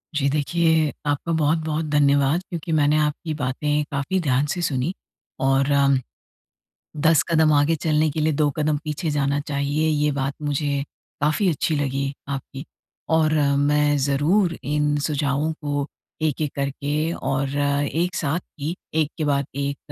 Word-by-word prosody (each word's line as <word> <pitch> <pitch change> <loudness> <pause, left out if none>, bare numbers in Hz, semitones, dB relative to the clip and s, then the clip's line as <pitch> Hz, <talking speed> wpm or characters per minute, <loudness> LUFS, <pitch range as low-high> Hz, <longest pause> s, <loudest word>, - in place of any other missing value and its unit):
जी 140 -2 +2
देखिए, 160 +1 +2
आपका 145 +3 -1
बहुत-बहुत 160 0 0
धन्यवाद 145 +2 +3
क्योंकि 170 -1 -5
मैंने 150 -1 +3
आपकी 150 +1 -1
बातें 150 +2 -1
काफ़ी 140 +7 -1
ध्यान 140 -3 +1
से 175 - -4
सुनी 145 +2 -1 0.5
और 135 +1 +2
उम, 140 -1 +4 1.0
10 160 +1 +4
कदम 160 -2 +4
आगे 145 +3 +3
चलने 155 0 +1
के 155 - -3
लिए 155 0 +2
2 150 0 +2
कदम 150 0 +1
पीछे 150 +1 -2
जाना 145 0 0
चाहिए 145 +2 -1
ये 150 -1 +2
बात 135 0 -2
मुझे 145 -1 -1 0.4
काफ़ी 155 +7 +2
अच्छी 160 0 0
लगी 140 -1 -1 0.2
आपकी। 135 0 -5 0.5
और 160 -1 +3 0.3
मैं 145 0 +3
ज़रूर 155 +7 +2
इन 150 +1 0
सुझावों 145 +1 0
को 145 -1 -1 0.4
एक-एक 150 -1 0
करके 145 +3 -1
और 135 +1 -2
एक 145 +5 0
साथ 160 0 -1 0.2
ही 155 +5 -2 0.2
एक 155 -2 +1
के 155 - 0
बाद 140 -1 +1
एक 140 0 -2
150 Hz, 150 wpm, -23 LUFS, 140-155 Hz, 1.0 s, उम